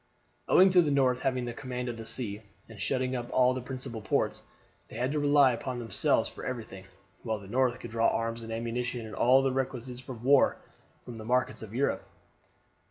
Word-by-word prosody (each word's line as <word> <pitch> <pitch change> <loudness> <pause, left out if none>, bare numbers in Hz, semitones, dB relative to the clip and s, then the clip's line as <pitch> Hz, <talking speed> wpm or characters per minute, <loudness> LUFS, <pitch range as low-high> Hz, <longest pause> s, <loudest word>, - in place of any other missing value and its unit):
Owing 190 +1 +6
to 180 -1 +6
the 155 - +1
North 130 -3 +2
having 130 -2 -1
the 120 - -4
command 125 -1 -5
of 120 - -3
the 115 0 -8
sea, 110 -5 -3 0.3
and 110 -3 -11
shutting 130 +5 0
up 120 -1 -4
all 125 0 +4
the 130 - -4
principal 125 -2 -6
ports, - - 0 0.5
they - - -12
had 125 +2 -1
to 150 - 0
rely 145 -2 +5
upon 125 +1 -4
themselves 115 -2 +1
for - - -10
everything, 110 -6 -6 0.4
while 110 -2 -2
the 100 - -12
North 125 +3 +1
could 120 - -8
draw 115 0 +2
arms 115 0 -1
and 115 0 -7
ammunition 120 +1 -3
and 110 - -9
all 130 +2 +4
the 135 - +2
requisites 130 0 -4
of 120 -3 -7
war 140 +2 +5 0.5
from 120 -2 -8
the 110 - -8
markets 125 +2 0
of 110 0 -9
Europe. 140 +3 0
125 Hz, 205 wpm, -29 LUFS, 115-130 Hz, 0.5 s, Owing